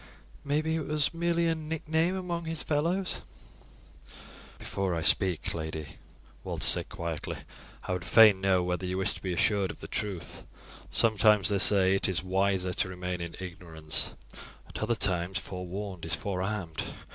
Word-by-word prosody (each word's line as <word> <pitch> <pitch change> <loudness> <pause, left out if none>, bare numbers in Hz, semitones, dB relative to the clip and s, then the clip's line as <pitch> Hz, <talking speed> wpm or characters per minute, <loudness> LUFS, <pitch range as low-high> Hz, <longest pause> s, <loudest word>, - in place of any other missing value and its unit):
Maybe 155 +3 0
it 155 - -4
was 150 0 +1
merely 170 0 +1
a 165 - +3
nickname 160 +2 -1
among 175 -3 -3
his 160 -1 -1
fellows." 170 +6 0 1.4
"Before 95 -3 -2
I 80 - -2
speak, 90 0 +3
lady," 80 -2 -5 0.5
Walter - - -2
said - - +5
quietly, 85 -2 -4 0.5
"I - - -2
would 90 -1 -3
fain 105 -1 +7
know 95 -2 +3
whether 90 +1 -2
you 90 0 -2
wish 95 +2 0
to - - -11
be 95 - -3
assured 95 +2 +2
of - - -8
the - - -8
truth. 95 -5 -4 0.5
Sometimes, 105 -4 +4
they 100 -1 +1
say, 95 -1 +4
it 95 - +2
is 90 -1 -1
wiser 95 -1 +1
to 95 - +1
remain 90 -1 -4
in 85 0 -5
ignorance; 85 -4 -3 0.5
at - - -7
other 120 - +1
times 90 -2 +1
forewarned 95 0 -6
is 80 - 0
forearmed. 95 -3 -3
95 Hz, 155 wpm, -29 LUFS, 90-145 Hz, 1.4 s, fain